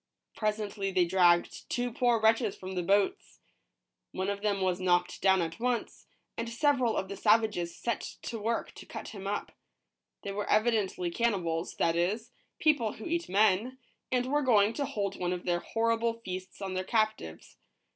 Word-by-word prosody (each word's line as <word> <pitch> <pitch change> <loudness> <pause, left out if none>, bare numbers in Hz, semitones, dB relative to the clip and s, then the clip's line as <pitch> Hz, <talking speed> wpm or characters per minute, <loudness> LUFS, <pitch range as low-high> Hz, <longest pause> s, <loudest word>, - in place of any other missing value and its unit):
Presently 210 -2 -2
they 185 -2 +3
dragged 175 -1 +2
two 245 0 -1
poor 240 -1 +2
wretches 220 -1 +3
from 185 0 -7
the 180 - -1
boats. 195 +3 0 0.7
One 190 +2 -1
of 200 0 -5
them 205 -2 0
was 185 -1 0
knocked 180 -1 +1
down 190 -2 +4
at 165 +4 -5
once, 245 0 -2 0.3
and 230 0 -3
several 250 -1 +2
of 190 - -1
the 200 - -6
savages 210 -6 +2
set 235 - -2 0.2
to 230 - -4
work 230 +2 -2
to - - -12
cut - - -7
him 195 -3 -7
up. 205 +1 -3 0.7
They 200 - -4
were 205 +1 -4
evidently 210 -5 +1
cannibals, 175 -6 -1
that 165 0 +1
is, 210 +8 -1 0.3
people 290 -9 +2
who 220 - -10
eat 340 0 -2
men, 215 +5 +2 0.3
and 250 -1 +1
were 290 +3 +1
going 220 -5 +4
to 285 - -2
hold 205 -8 -3
one 180 0 0
of 180 - -6
their 175 -1 +1
horrible 230 +3 0
feasts 185 +1 -6
on 190 -1 -3
their 185 0 -1
captives. 215 - -2
205 Hz, 175 wpm, -30 LUFS, 185-230 Hz, 0.7 s, down